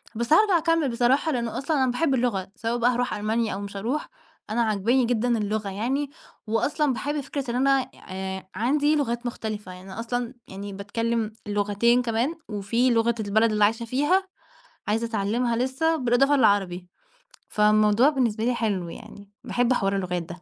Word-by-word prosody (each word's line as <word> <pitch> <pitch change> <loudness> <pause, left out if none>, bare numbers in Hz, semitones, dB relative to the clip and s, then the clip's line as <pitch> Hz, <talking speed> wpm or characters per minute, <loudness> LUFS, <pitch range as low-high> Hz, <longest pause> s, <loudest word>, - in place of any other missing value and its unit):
بس 235 +6 +1
هارجع 395 +1 +5
أكمل 330 -3 +1
بصراحة 250 +6 +2
لأنه 235 -4 -2
أصلًا 295 +3 -1
أنا 255 - +2
باحب 275 +3 +1
اللغة 235 -7 0
سواء 230 +2 -2
بقى 240 +1 +3
هاروح 245 +1 -1
ألمانيا 220 +2 -1
أو 195 - -4
مش 200 0 -7
هاروح 245 +9 -2 0.4
أنا 235 +2 0
عجباني 225 +4 +2
جدًا 240 0 +1
اللغة 210 -1 -2
يعني، 255 +9 -2 0.4
وأصلًا 280 +6 +1
باحب 290 +4 -2
فكرة 275 -2 -4
إن - - -3
أنا 270 0 +2 0.2
آآ 190 0 -5
عندي 290 +8 +2
لغات 240 -4 -1
مختلفة 215 -5 -5
يعني 185 +1 -11
أنا 205 - -7
أصلًا 245 +1 -3
يعني 200 +1 -7
باتكلم 225 +2 -2
لُّغتين 205 +4 +2
كمان 245 +6 -1 0.3
في 235 +6 +2
لغة 235 -1 +2
البلد 220 +2 +2
اللي 210 -1 +2
عايشة 225 +3 +2
فيها 295 +11 +1 0.6
عايزة 225 +2 0
اتعلمها 230 +3 0
لسّة، 265 +7 +1
بالإضافة 275 +1 +3
للعربي 195 -6 +2 0.6
فالموضوع 210 +4 +4
بالنسبة 235 -7 0
لي 245 +2 +2
حلو 200 -7 -1
يعني 200 +4 -11
باحب 245 +1 +1
حوار 195 -4 0
اللغات 180 -3 -2
ده 175 +1 -10
235 Hz, 170 wpm, -25 LUFS, 205-255 Hz, 0.6 s, هارجع